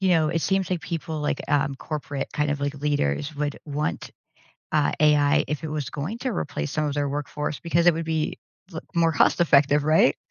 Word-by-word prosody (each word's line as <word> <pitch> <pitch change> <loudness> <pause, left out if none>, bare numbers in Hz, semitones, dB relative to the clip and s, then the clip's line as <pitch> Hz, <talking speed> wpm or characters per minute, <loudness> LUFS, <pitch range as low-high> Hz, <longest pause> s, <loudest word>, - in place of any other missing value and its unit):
you 190 - +2
know, 160 -4 +3
it 165 0 0
seems 190 -1 +1
like 180 - 0
people, 160 +1 -4
like, 150 - -1
um, 140 -1 +1
corporate 145 -2 -5
kind 150 0 0
of, 145 -1 -2
like, 140 0 -1
leaders 145 - -1
would 145 0 -2
want, 150 +1 -3 0.6
uh, 150 -2 +3
AI 150 -1 +4
if 150 +1 -3
it 160 - -3
was 150 -4 -3
going 155 - -4
to 255 +1 -2
replace 145 -5 -3
some 155 - -1
of 145 - -1
their 145 -1 0
workforce 145 +1 -3
because 170 +1 +2
it 175 - +7
would 165 0 -3
be 160 -1 -1 0.4
l 160 - -5
more 165 -1 +3
cost-effective, 145 -2 +4
right? 155 -3 +4
150 Hz, 205 wpm, -25 LUFS, 145-165 Hz, 0.6 s, it